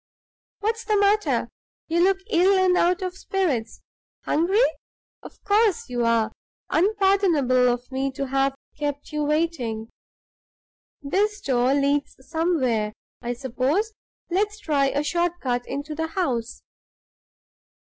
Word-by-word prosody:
What's 450 +2 -1
the 425 -2 +1
matter? 410 +1 +2 0.4
You 340 +1 +2
look 385 +1 +4
ill 380 +3 +4
and 370 -1 +4
out 360 +2 +2
of 365 -1 -3
spirits. 350 - -2 0.4
Hungry? 385 +10 +3 0.6
Of - - -14
course 415 - +2
you 240 -1 0
are! 230 -1 +2 0.4
unpardonable 365 - +3
of 245 +2 -5
me 270 +1 -1
to 275 - -3
have 270 0 +1 0.2
kept 290 -1 -3
you 300 0 -1
waiting. 290 -8 -1 1.1
This 410 +8 0
door 255 0 +2
leads 285 0 +1
somewhere, 260 -11 0 0.3
I 240 +1 -2
suppose; 265 - -1 0.4
let's 415 +4 0
try 285 -6 +1
a 285 +2 0
short 345 +2 0
cut 245 -3 -2
into 285 +3 -4
the 320 +1 -2
house. 260 -10 -2
300 Hz, 125 wpm, -24 LUFS, 260-380 Hz, 1.1 s, look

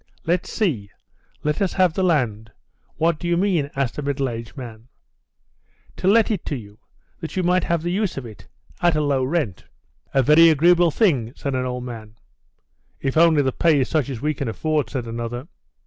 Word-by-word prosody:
"Let's 175 +2 0
see. 135 - -1 0.5
Let 150 +4 -1
us 195 - +1
have 185 -3 +3
the 190 - -1
land? 120 - 0 0.4
What 165 0 +1
do 175 - -4
you 170 0 +2
mean?" 175 -7 +1
asked 135 0 -2
a - - -2
middle 140 -1 -1
aged 115 +2 -7
man. 115 -3 -9 1.1
"To - - -2
let 220 +3 +4
it 200 -6 -2
to 145 - -1
you, 105 -4 -10 0.4
that 165 +2 -7
you 185 - +1
might 180 +1 +2
have 170 -2 0
the 175 - -1
use 195 -2 -1
of 135 - -5
it, 110 -5 -12 0.3
at 175 -2 +3
a 155 - +1
low 140 -3 +1
rent." 130 - -2 0.5
"A 135 - +3
very 155 +5 +7
agreeable 170 +3 +4
thing," 145 - +1
said 140 - -4
an 130 0 -1
old 125 0 -4
man. 110 -3 -9 0.8
"If 135 - -2
only 160 -2 +5
the 130 - +1
pay 160 +1 +3
is 130 - -1
such 150 -5 0
as 130 -4 -5
we 150 +1 0
can 140 -3 -4
afford," 150 +3 -1
said 125 -2 -4
another. 120 +3 -5
145 Hz, 200 wpm, -22 LUFS, 125-170 Hz, 1.1 s, very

